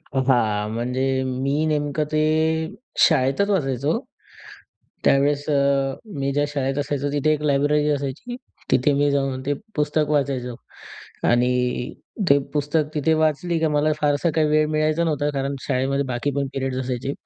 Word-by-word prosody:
अ, 135 - -5
हां, 105 -4 +2
म्हणजे 125 +3 -1 0.4
मी 140 +1 0 0.2
नेमकं 150 0 -1
ते 155 - +2 0.9
शाळेतच 145 +6 +2
वाचायचो. 140 -2 0 1.1
त्यावेळेस 140 +1 +3
अ, 145 - +3 0.6
मी 135 0 0
ज्या 145 0 +2
शाळेत 135 -1 -1
असायचो, 145 0 -2
तिथे 145 +1 +2
एक 150 - -1
लायब्ररी 145 +2 +2
असायची. 145 - -3 0.3
तिथे 135 +3 +3
मी 145 0 +3
जाऊन 135 -2 -1
ते 145 - +1 0.2
पुस्तक 150 0 +1
वाचायचो 135 -4 0 0.7
आणि 125 +1 +3 0.8
ते 140 - +7
पुस्तक 150 +1 0
तिथे 155 +2 +2
वाचली 160 +2 +1
की 160 - +1
मला 155 +1 +2
फारसा 150 +2 +2
काही 155 -1 +3
वेळ 155 0 +3
मिळायचा 155 +2 +1
नव्हता. 145 -2 0
कारण 140 +1 -1
शाळेमध्ये 140 +1 0
बाकी 120 +4 -1
पण 140 -1 0
पिरियड्स 135 -1 -2
असायचे. 130 +1 -3
145 Hz, 145 wpm, -22 LUFS, 135-150 Hz, 1.1 s, ते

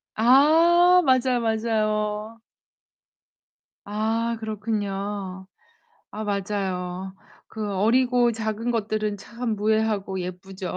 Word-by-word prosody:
아 330 +9 +5
맞아요, 255 -2 +3
맞아요. 215 -1 -1 1.5
아, 225 +3 -1
그렇군요. 205 -3 -4 0.6
아, 215 +1 -6
맞아요. 190 -2 -3 0.3
그 215 -2 -5
어리고 240 +4 +3
작은 220 +1 -3
것들은 215 -2 -1
참 230 +2 -4
무해하고 210 -3 0
예쁘죠. 185 +1 -6
215 Hz, 185 characters per minute, -24 LUFS, 200-230 Hz, 1.5 s, 아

